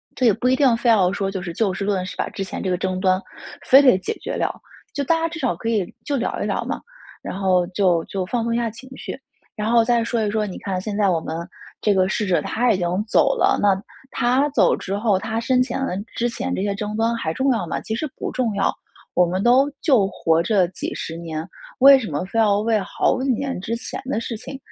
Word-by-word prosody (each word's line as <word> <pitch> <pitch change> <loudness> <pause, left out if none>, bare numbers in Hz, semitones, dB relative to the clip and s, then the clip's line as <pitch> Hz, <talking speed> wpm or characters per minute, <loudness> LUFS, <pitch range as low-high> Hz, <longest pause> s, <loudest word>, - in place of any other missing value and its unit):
这 255 - 0
也 225 - +6
不 230 +5 -1
一 260 - +4
定 260 -3 +4
非 235 - +1
要 190 -5 +4
说 195 -1 -2
就 190 -1 -4
是 175 -2 -5
就 195 0 0
事 195 - -4
论 195 -3 0
事， - - -7
把 - - -2
之 195 - -5
前 - - -6
这 190 - -1
个 180 - +1
争 185 0 -2
端 185 0 +2 0.4
非 270 +1 +8
得 255 -9 +6
解 185 - -3
决 - - -4
掉， - - -2 0.3
就 285 - -1
大 330 +4 +2
家 330 - 0
至 330 0 -7
少 260 -4 0
可 225 - -6
以 205 -6 -1
就 285 - -1
聊 245 - -2
一 - - -2
聊 - - -1
嘛， - - -3 0.4
然 - - -5
后 185 -2 +2
就 185 -3 +2
就 190 -2 -3
放 235 +3 -1
松 230 0 -1
一 - - +1
下 235 -1 0
情 235 +4 -12
绪。 - - -7 0.4
然 215 0 -2
后 235 -1 +5
再 235 0 +2
说 230 -1 -1
一 205 - 0
说， 215 0 0
你 190 - -6
看 190 -2 -3
现 205 +1 -4
在 200 -2 +3
我 170 - +2
们 160 0 -5 0.5
这 210 - +3
个 185 -1 +3
逝 210 +2 -1
者 180 - +3
他 240 +1 +1
已 200 - +2
经 175 -2 -1 0.2
走 - - +3
了， - - +3
那 205 - +4 0.4
他 255 +4 +2
走 290 - +3
之 195 - -4
后， 210 -4 +2
他 220 +3 -3
生 250 +2 +2
前 260 - -4
的 180 - -3 0.2
之 240 +1 0
前 265 +2 -3
这 - - -2
些 200 0 -1
争 210 +1 -4
端 225 +1 +1
还 160 -8 -2
重 265 +8 +1
要 230 - 0
吗？ - - -3
其 220 - -4
实 310 +7 -2
不 - - -4
重 245 -4 -1
要。 195 - +2 0.4
我 180 - +5
们 185 +3 -2
都 260 +4 +5
就 245 - +4
活 165 -4 +1
这 190 +1 +2
几 180 - -5
十 165 - -5
年， 160 -2 -5 0.3
为 270 +1 +9
什 220 - -5
么 145 +3 -2
非 210 +4 -2
要 205 -2 +4
为 220 0 +1
好 205 - 0
几 270 - -1
年 265 -3 -2
之 225 +5 -3
前 235 - -6
的 260 -4 -1
事 230 -2 -4
情 270 +5 -8
215 Hz, 280 characters per minute, -22 LUFS, 190-240 Hz, 0.5 s, 为